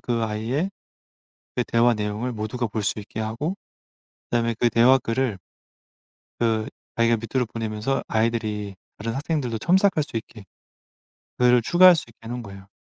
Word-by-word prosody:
그 120 -2 -1
아이의 115 - -1 0.9
그 125 - +1
대화 120 0 +3
내용을 105 +4 -2
모두가 110 +3 -3
볼 110 0 -3
수 105 - -1
있게 105 +1 -6
하고 115 - -2 0.8
그다음에 115 0 +1
그 120 - +4
대화 125 +4 +6
글을 115 -3 -1 1.0
그 110 -2 +1 0.3
자기가 115 0 +3
밑으로 120 +3 -1
보내면서 110 +3 -2
아이들이 110 -3 -1 0.2
다른 115 +2 -3
학생들도 140 -6 -1
첨삭할 185 - +3
수 125 - -5
있게 110 -2 -9 0.9
그거를 125 -1 +5
추가할 180 +7 +7
수 160 - -3
있게 115 - -20
해 - - -7
놓은 120 -1 -4
거예요. 95 -1 -11
115 Hz, 330 characters per minute, -24 LUFS, 110-125 Hz, 1.0 s, 추가할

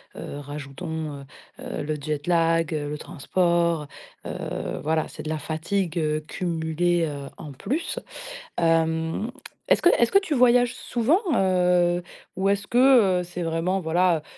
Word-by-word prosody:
heu, 145 - -7
rajoutons, 145 +1 -6
heu - - -13 0.4
heu, - - -4
le 155 +1 -2
jet 145 +1 -4
lag, 165 -1 +2
heu, 145 -1 -3
le 150 - -4
transport, 170 0 0 0.4
heu - - -5
heu, - - -4
voilà, 155 +1 +1
c'est - - -9
de 155 - -5
la 155 -1 -2
fatigue, 170 +4 -2
heu, 155 -1 +1
cumulée, 170 0 0
heu, 140 -2 -6
en 145 -3 -8
plus. 295 - -3 0.6
Hem, 165 +5 +1 0.4
est-ce - - +4
que 350 - +5
est-ce 235 - +3
que 395 - +7
tu 355 -7 -2
voyages 245 -1 +4
souvent, 255 - +1
heu, 180 -2 +3 0.3
ou 195 +1 +1
est-ce 200 +1 0
que, 240 -8 +5
heu, - - -2
c'est 175 0 -7
vraiment 165 +4 0
voilà, 170 -1 +2
170 Hz, 160 wpm, -25 LUFS, 155-190 Hz, 0.6 s, que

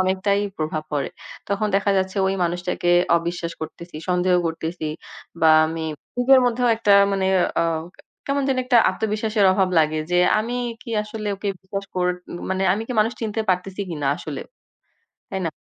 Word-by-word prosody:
অনেকটাই 190 +2 +1 0.2
প্রভাব 155 0 -2
পড়ে। 145 -2 -1 0.4
তখন 200 +2 0
দেখা 200 +1 +1
যাচ্ছে 190 +1 -2
ঐ - - +2 0.2
মানুষটাকে 175 0 -1 0.3
অবিশ্বাস 170 0 -3
করতেছি, 160 +1 -8
সন্দেহ 180 0 +2
করতেছি 165 0 -4 0.5
বা 160 - +5 0.2
আমি 160 0 -4 0.3
নিজের 260 +2 +6
মধ্যেও 245 0 +1
অনেকটা 225 -3 +3 0.2
মানে 195 -1 0 0.3
আ - - +3 0.6
কেমন 280 0 0
যেন 265 -1 +1
একটা 250 -1 +3
আত্মবিশ্বাসের 215 -1 0
অভাব 190 -1 +2
লাগে, 155 0 +2
যে 180 - +3 0.2
আমি 230 +3 -2 0.3
কি 240 - -9
আসলে 210 0 -5
ওকে 200 +1 -4
বিশ্বাস 195 +1 -5
কর 180 -1 +1 0.7
আমি 215 - -3
কি - - -2
মানুষ 220 +3 +1
চিনতে 220 -1 -2
পারতেছি 185 +2 -2
কিনা 150 -4 -3
আসলে। - - -6 0.9
তাই 190 - -3
না? - - 0
190 Hz, 155 wpm, -22 LUFS, 170-215 Hz, 0.9 s, নিজের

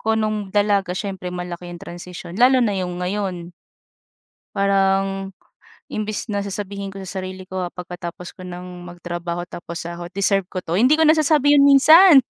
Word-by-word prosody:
ko 220 0 +1
no'ng 215 -2 -1
dalaga, 205 -3 +2
siyempre 190 -3 -4
malaki 175 0 -6
ang - - -7
transition, 175 +1 -8
lalo 255 +1 +6
na 210 - +1
'yong 180 -1 -3
ngayon. 180 -3 -3 1.0
Parang, 195 0 +1 0.6
imbis 215 +1 -4
na 200 -1 -2
sasabihin 200 0 -5
ko 195 - -9
sa 190 - -8
sarili 185 0 -7
ko, 185 -1 -3
ah, 175 - -4
pagkatapos 180 0 -8
ko 185 - -11
ng 180 0 -8
magtrabaho 175 0 -5
tapos 170 0 -7
sahod, 175 +1 -7
"deserve 195 0 +1
ko 185 - -2
'to," 170 -1 -3
hindi 255 - +4
ko 320 - +5
nasasabi 305 -2 +4
'yon 280 - +6
minsan. 290 +4 +8
195 Hz, 165 wpm, -21 LUFS, 180-210 Hz, 1.0 s, minsan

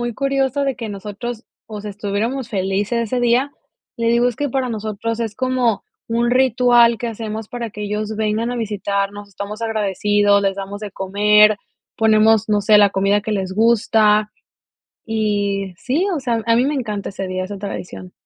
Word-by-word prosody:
muy 240 -1 -3
curioso 275 +1 0
de 270 -2 -1
que 230 - -5
nosotros 210 +4 -6 0.4
estuviéramos 210 +5 -3
felices 195 +3 -1
ese 250 - +1
día. 245 +3 +2 0.5
Le 230 0 -1
digo, 235 +1 +3
es 240 - -5
que 290 - -1
para 260 0 -1
nosotros 220 +1 -3
es 225 -2 -3
como 255 -4 0 0.3
un 235 +1 +1
ritual 245 -2 +4
que 240 - -3
hacemos 220 -1 -5
para 235 -2 -5
que 210 +1 -7
ellos 210 +1 -3
vengan 220 +2 -1
a 245 - -3
visitarnos. 205 -2 -3
Estamos 200 +2 -7
agradecidos, 205 -1 +2
les 195 -1 +1
damos 200 +1 -6
de 210 -1 -6
comer, 210 +2 +4 0.4
ponemos, 220 0 +4
no 210 -1 +2
sé, 210 0 +6
la 205 -1 +6
comida 195 +2 +2
que 215 +1 -3
les 190 -2 -2
gusta, 215 -1 +3 0.8
y 205 -3 -1
sí, 270 - 0
o - - -2
sea, 235 -4 -1
a 230 - +4
mí 245 - +3
me 290 - 0
encanta 210 -6 -3
ese 195 -1 -5
día, 185 0 -3
esa 200 +1 -7
tradición. 185 -2 -7
215 Hz, 175 wpm, -19 LUFS, 205-235 Hz, 0.8 s, sé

